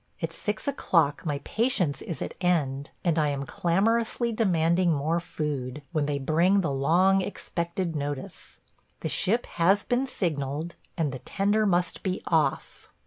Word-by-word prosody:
At - - -3
six 210 +4 -4
o'clock 165 - +1
my 145 -2 -1
patience 220 - 0
is 170 - -4
at - - -5
end, 145 -6 +1
and 170 -3 +2
I 150 - +3
am 140 -1 -2
clamorously 225 - +1
demanding 175 -5 +2
more 155 +3 +1
food, 145 -4 -4
when 155 -4 0
they 145 -1 0
bring 170 +8 +3
the 165 -6 -1
long 175 +8 +3
expected 170 -2 -3
notice. 145 -2 -5 0.4
The - - -2
ship 230 +6 +1
has 190 +4 +2
been 250 +2 0
signaled, 155 - -2 0.2
and 155 -4 0
the 130 - -6
tender 205 +6 +1
must 175 -2 +1
be 185 -1 -2
off. 155 -5 0
170 Hz, 150 wpm, -27 LUFS, 145-195 Hz, 0.4 s, I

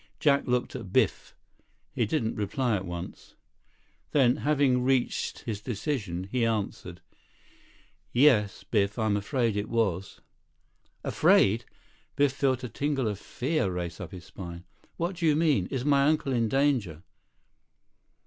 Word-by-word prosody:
Jack 140 -2 +3
looked 125 +1 0
at 110 -8 -7
Biff. - - +1 0.6
He 115 - 0
didn't 115 -4 0
reply 115 +3 -1
at 95 -2 -4
once. 85 0 -8 0.8
Then, 130 -2 +4
having 140 -5 +2
reached 130 -1 0
his 105 -3 -5
decision, 105 - -3
he 125 -2 +1
answered. 100 -6 -2 1.1
"Yes, 120 -6 +3
Biff. 100 -1 0
I'm 110 -3 +1
afraid 115 +2 0
it 105 0 -2
was." 100 -5 -1 0.8
"Afraid?" 110 +4 +3 0.5
Biff 140 -2 +3
felt 130 -2 0
a - - -2
tingle 140 0 -1
of 105 -2 -3
fear 135 -2 -1
race 90 0 -4
up 90 - -7
his 90 -2 -10
spine. 85 -3 -9 0.3
"What 175 +2 -2
do 165 -2 +1
you 150 - +4
mean? 150 - +2
Is 130 -1 -3
my 140 -1 +4
uncle 150 -3 +1
in 115 -2 +1
danger?" 125 - +1
120 Hz, 140 wpm, -28 LUFS, 100-140 Hz, 1.1 s, Then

